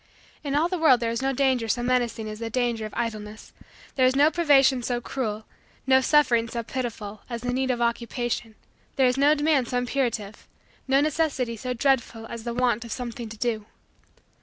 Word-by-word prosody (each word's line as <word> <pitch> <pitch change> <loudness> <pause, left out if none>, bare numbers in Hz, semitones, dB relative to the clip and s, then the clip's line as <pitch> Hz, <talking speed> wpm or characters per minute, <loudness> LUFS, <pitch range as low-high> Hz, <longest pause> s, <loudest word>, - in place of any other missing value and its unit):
In 280 -1 -2
all 310 +3 +3
the 360 0 -3
world 285 -6 +5
there 230 -1 -1
is 230 - -2
no 270 0 +1
danger 260 -3 +1
so 240 +3 0
menacing 245 -3 0
as 215 0 -7
the 230 -1 -4
danger 235 -2 -1
of 215 - -15
idleness: 215 -2 -5 0.4
there 260 - +3
is 260 - +1
no 290 +3 +5
privation 280 -6 +4
so 240 0 -1
cruel, 220 -4 -4 0.4
no 265 0 +5
suffering 250 -6 +3
so 235 0 -4
pitiful, 215 -4 -5
as 235 -1 -4
the 245 0 -2
need 260 +1 0
of 245 -2 0
Occupation: 235 -1 -2 0.4
there 265 - +3
is 250 0 +3
no 285 +3 +4
demand 295 -4 +2
so 250 - -1
imperative, 240 -5 -2 0.4
no 270 +1 +4
necessity 285 -6 0
so 250 +3 -4
dreadful, 240 -3 0
as 230 0 -8
the 235 - -2
want 240 -2 +1
of 230 - -9
something 235 -2 -5
to 220 - -9
do. 220 -2 -2
245 Hz, 195 wpm, -25 LUFS, 230-265 Hz, 0.4 s, world